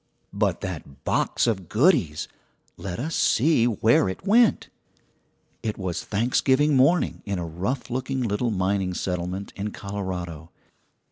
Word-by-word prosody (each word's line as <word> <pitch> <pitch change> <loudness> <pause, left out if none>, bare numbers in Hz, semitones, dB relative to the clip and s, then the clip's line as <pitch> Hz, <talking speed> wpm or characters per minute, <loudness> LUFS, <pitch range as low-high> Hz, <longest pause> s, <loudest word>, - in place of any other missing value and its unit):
But - - 0
that 70 - -7
box - - +1
of 95 -7 -1
goodies! 110 - +2 0.5
Let 90 -2 -6
us 155 +7 -3
see 130 -2 +3
where 110 -3 +3
it 95 - -7
went. 225 +3 +4 0.9
It 110 -2 -3
was 90 -2 -3
Thanksgiving 130 +6 +2
morning 140 +7 +3
in 100 -2 -3
a 85 - -3
rough 95 - -3
looking 130 +1 -2
little 115 +2 0
mining 95 -2 0
settlement 90 +2 -3
in 100 +1 -3
Colorado. 90 -6 -5
100 Hz, 130 wpm, -25 LUFS, 90-130 Hz, 0.9 s, went